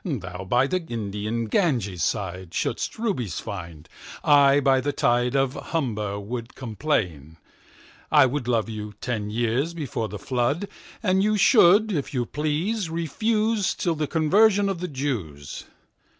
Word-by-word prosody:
Thou 95 - -5
by 120 +7 +3
the 185 +5 -1
Indian 110 +1 -3
Ganges 115 - 0
sideShould'st 90 +1 -2
Rubies 180 - -2
find: 85 -6 -8 0.4
I 140 -1 +6
by 135 -1 +3
the 145 +2 -1
TideOf 125 +2 +1
Humber 105 -10 -2
would 115 +4 -6
complain. 100 - -2 0.7
I 145 -3 +7
wouldLove 120 -4 0
you 105 -2 -6
ten 110 -4 -3
years 120 +9 -1
before 130 -8 -3
the 105 - -6
Flood:And 170 - -1
you 210 +1 +2
should 210 0 +6
if 145 -5 -3
you 120 -1 0
please 160 - -1
refuseTill 200 +3 0
the 150 -1 -2
Conversion 200 +6 +3
of 190 -3 -3
the 180 - -3
Jews. 105 - -4
130 Hz, 125 wpm, -24 LUFS, 105-170 Hz, 0.7 s, I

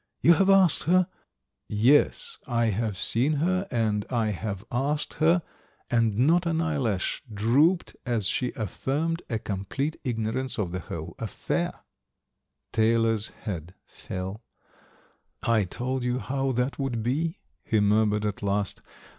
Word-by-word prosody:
You 170 - +7
have 195 +3 +3
asked 190 -4 +5
her 180 +3 +4 0.4
" - - -57 0.3
"Yes, 460 - +1
I 115 -3 +2
have 105 -1 -2
seen 125 +10 +1
her 185 +6 +1
and 110 -3 0
I 115 -3 +1
have 100 +1 -4
asked 140 +4 -1
her, 165 +2 +4 0.5
and 115 -3 +2
not 165 +8 +4
an 165 -1 +1
eyelash 135 - 0
drooped 135 - +2
as 115 -5 -1
she 125 +4 0
affirmed 145 - -2
a 115 - 0
complete 110 +9 -3
ignorance 120 +1 -2
of 95 -6 -1
the 90 - -3
whole 80 - -6
affair." - - -2 1.0
Taylor's 115 -1 +2 0.2
head 90 -3 -5
fell. 95 +4 -6 1.0
"I 115 -3 +3
told 125 +7 -3
you 125 0 0
how 135 +1 -1
that 125 +4 -1
would 125 -5 -1
be," 155 +8 0 0.3
he 110 - +1
murmured 105 0 +3
at 105 -2 -2
last. 100 -1 -1
120 Hz, 140 wpm, -27 LUFS, 105-150 Hz, 1.0 s, You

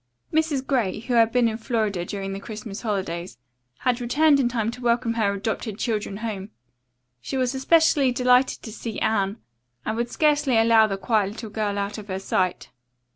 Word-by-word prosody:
Mrs. 310 -4 +1
Gray, 240 -10 0
who 245 +2 -3
had 230 -1 +5
been 245 -1 +3
in 220 -1 -2
Florida 215 -6 -1
during 195 +1 -5
the 195 - -5
Christmas 210 -1 -7
holidays, 185 - -3 0.4
had 250 -1 +1
returned 285 +4 +4
in 245 -3 +2
time 230 -2 -1
to 250 +1 -10
welcome 235 -1 +1
her 210 -3 +1
adopted 215 0 -3
children 215 -4 -2
home. 200 -3 -4 0.7
She 265 - -4
was 255 0 0
especially 285 0 +3
delighted 250 +1 +3
to 220 - -7
see 225 0 -5
Anne 200 -1 0 0.5
and 220 - -1
would 235 +1 -2
scarcely 290 -4 +2
allow 225 -1 +5
the 195 -2 -3
quiet 205 -1 +1
little 220 -1 -8
girl 210 -2 -2
out 200 +2 -3
of 210 - -10
her 190 -1 -3
sight. 185 -1 -1
225 Hz, 180 wpm, -24 LUFS, 205-250 Hz, 0.7 s, had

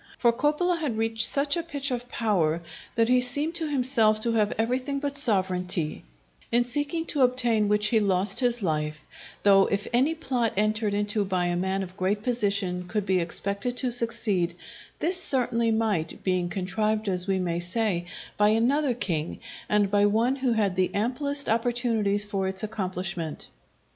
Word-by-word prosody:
For 235 -2 +3
Coppola 305 +7 0
had 275 -9 -3
reached 225 0 +4
such 285 +2 +1
a 340 - -1
pitch 285 -4 -3
of 245 0 -4
power 175 -10 0 0.4
that 230 0 +2
he 250 +1 +3
seemed 285 +6 +2
to 330 -2 0
himself 245 -6 +2
to 235 - +1
have 210 -2 +1
everything 255 +5 -1
but 280 0 -3
sovereignty; 185 - 0 0.5
in 240 +1 +4
seeking 290 +6 -2
to 290 - 0
obtain 240 -4 +3
which 210 +1 +3
he 225 - +3
lost 195 -1 +1
his 240 -3 +1
life; 155 -2 -2 0.4
though 195 -1 +5
if 200 0 -2
any 270 +7 +2
plot 255 -8 -1
entered 215 0 0
into 205 0 0
by 185 -2 -1
a 175 0 -1
man 190 +2 -1
of 185 0 -10
great 205 +2 -1
position 200 -7 0
could 210 +1 -2
be 190 -2 +1
expected 200 +7 -1
to 255 -1 0
succeed, 215 -7 +1 0.4
this 360 +2 +1
certainly 235 -6 +1
might, 215 -8 -1
being 180 -2 0
contrived, 215 +4 -2
as 180 -1 -1
we 195 -1 +1
may 175 -2 -2
say, 175 0 -1 0.3
by 210 0 +4
another 250 +5 +1
king, 165 -8 -2 0.3
and 205 -2 +2
by 205 0 +4
one 230 +6 +1
who 260 -3 0
had 205 -4 0
the 185 0 +1
amplest 280 +6 0
opportunities 230 -3 +1
for 195 -2 -2
its 190 +1 -2
accomplishment. 185 -6 -4
215 Hz, 170 wpm, -26 LUFS, 190-245 Hz, 0.5 s, though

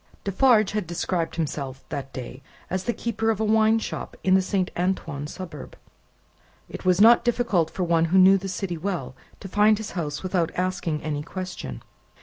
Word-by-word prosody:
Defarge 215 +1 +3
had 210 -4 -2
described 170 0 -2
himself, 140 -5 -4
that 140 -3 -5
day, 130 +1 -8 0.3
as 185 0 -2
the - - +1
keeper 225 -1 -2
of 220 -2 0
a 220 - +1
wine 220 +1 +4
shop 225 - -5
in 185 - +3
the 190 - +5
Saint 185 0 -1
Antoine 175 -6 -2
suburb. 165 -4 -8 0.9
It - - -8
was 185 0 +3
not 230 +3 +7
difficult 235 -9 +1
for 185 - -3
one 165 -1 +2
who 175 +3 +2
knew 190 +1 +7
the 195 +1 -5
city 175 -2 -4
well, 170 -8 -3 0.3
to - - -7
find 210 +3 +4
his 220 0 -6
house 150 -4 -4
without 180 -3 0
asking 180 -4 -2
any 150 -2 -2
question. 180 - -6
185 Hz, 180 wpm, -25 LUFS, 165-205 Hz, 0.9 s, not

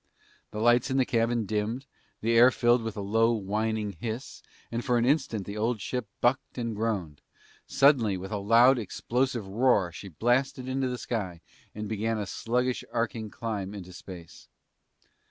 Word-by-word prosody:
The 105 - -8
lights 120 +3 +4
in 135 - 0
the 130 - +3
cabin 115 -1 +1
dimmed, 110 +6 -2 0.4
the 115 +1 +1
air 120 +1 +8
was 130 - +4
filled 120 0 +3
with 115 -1 -5
a - - -2
low 115 +4 +2
whining 110 0 -1
hiss, 110 - -6 0.3
and 120 +1 -2
for 125 -2 +2
an 120 - +2
instant 125 -7 +1
the 100 +1 -6
old 115 +1 0
ship 125 +2 -3
bucked 130 +2 +1
and 115 -3 -2
groaned. 100 -9 -2 0.5
Suddenly, 125 -9 +4
with 95 +1 -7
a 105 - -1
loud 120 +5 +5
explosive 120 +2 -2
roar, 105 -3 +2
she 95 +3 -9
blasted 125 - 0
into 130 0 0
the 125 - -3
sky 95 -9 -4 0.4
and 105 0 -4
began 110 +1 -1
a 105 - -2
sluggish 125 +5 -1
arching 115 -2 -2
climb 105 -3 -4
into 90 -2 -9
space. 90 -2 -11
115 Hz, 175 wpm, -28 LUFS, 105-120 Hz, 0.5 s, air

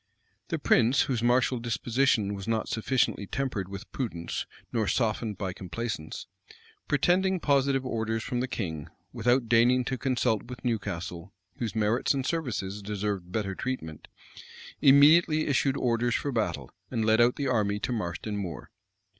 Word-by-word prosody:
[*] - - -44
The - - -1
prince, 125 +4 +3
whose 125 -4 -1
martial 120 +1 +2
disposition 115 -1 +1
was 100 0 -6
not 115 -1 0
sufficiently 115 -3 0
tempered 120 -8 -3
with 100 0 -8
prudence, 85 -10 -4 0.3
nor 110 -3 +1
softened 110 -3 0
by 95 -3 -3
complaisance, 95 -3 -5 0.6
pretending 180 +6 +2
positive 140 -3 +2
orders 110 -2 -2
from 125 -2 -2
the 125 - -1
king, 80 - -4 0.2
without 120 +1 +2
deigning 120 +2 +4
to 130 0 -3
consult 125 -5 +1
with 125 +1 -9
Newcastle, 95 -5 -3 0.2
whose 115 -2 -3
merits 110 +5 +1
and 135 -2 -2
services 110 - -2
deserved 100 -3 -3
better 100 -1 -2
treatment, 95 -10 -5 0.7
immediately 155 +3 +6
issued 140 -1 +1
orders 120 0 +1
for 145 - -1
battle, 115 -4 -2 0.2
and 115 -3 -1
led 110 +1 +4
out 120 +1 +4
the 140 - -3
army 105 -5 +1
to - - -2
Marston 105 -1 -3
Moor. 95 -5 -6
115 Hz, 150 wpm, -28 LUFS, 105-130 Hz, 0.7 s, immediately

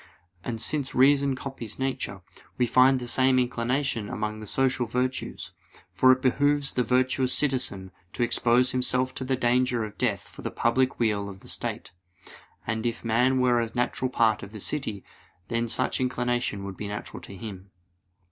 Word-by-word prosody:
And 115 -1 -4
since 140 +2 -1
reason 140 +1 +4
copies 130 -5 -6
nature, 135 0 -3 0.4
we 125 - +3
find 130 +2 +5
the 120 - -6
same 130 +1 +4
inclination 125 -1 -1
among 105 0 -3
the 110 - -8
social 130 +1 +1
virtues; 125 +3 -3 0.4
for 130 - +6
it 130 0 +2
behooves 145 +2 +2
the 125 - +1
virtuous 130 +1 +2
citizen 125 -10 +1 0.2
to 120 - -1
expose 120 +1 +3
himself 125 0 +1
to - - -5
the 130 0 0
danger 125 -1 +1
of 105 - -11
death 115 -6 -1
for - - -12
the - - -3
public 130 +3 +1
weal 105 -3 0
of 95 -1 -11
the - - -15
state; - - -3 0.7
and 110 +1 -1
if 115 0 -4
man 125 +4 +2
were 125 -2 +3
a 115 - -2
natural 125 +1 0
part 115 -4 +2
of 100 +2 -10
the 110 - -7
city, 110 -4 -3 0.4
then 115 0 0
such 130 +3 0
inclination 125 -5 -1
would 100 -2 -7
be 105 - -5
natural 105 +1 -6
to 100 - -10
him. 100 -1 -8
125 Hz, 175 wpm, -26 LUFS, 110-130 Hz, 0.7 s, for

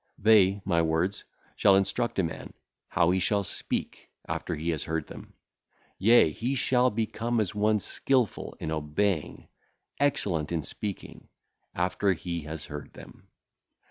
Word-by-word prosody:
They 100 -2 +4
(my 85 -3 +2
words) 80 +4 0 0.3
shall 100 - +5
instruct 115 +4 0
a 95 - +3
man; 80 - -5 0.4
how 85 0 +3
he 95 - +2
shall 100 +3 +1
speak, - - -4 0.2
after - - -3
he 80 +3 -2
hath 80 - -2
heard 80 0 -2
them; - - -12 0.6
yea, 110 -5 +6
he 120 - -2
shall 125 -1 +3
become 115 +1 -1
as 105 -2 -1
one 105 +1 +2
skilful 125 +2 -1
in 80 - -4
obeying, 80 +3 -1 0.5
excellent 90 - +1
in 80 -3 -1
speaking, 100 +6 -7 0.5
after 90 +2 +1
he 85 0 -4
hath 75 +1 -7
heard 75 -1 -8
them. - - -14
95 Hz, 140 wpm, -28 LUFS, 80-110 Hz, 0.6 s, yea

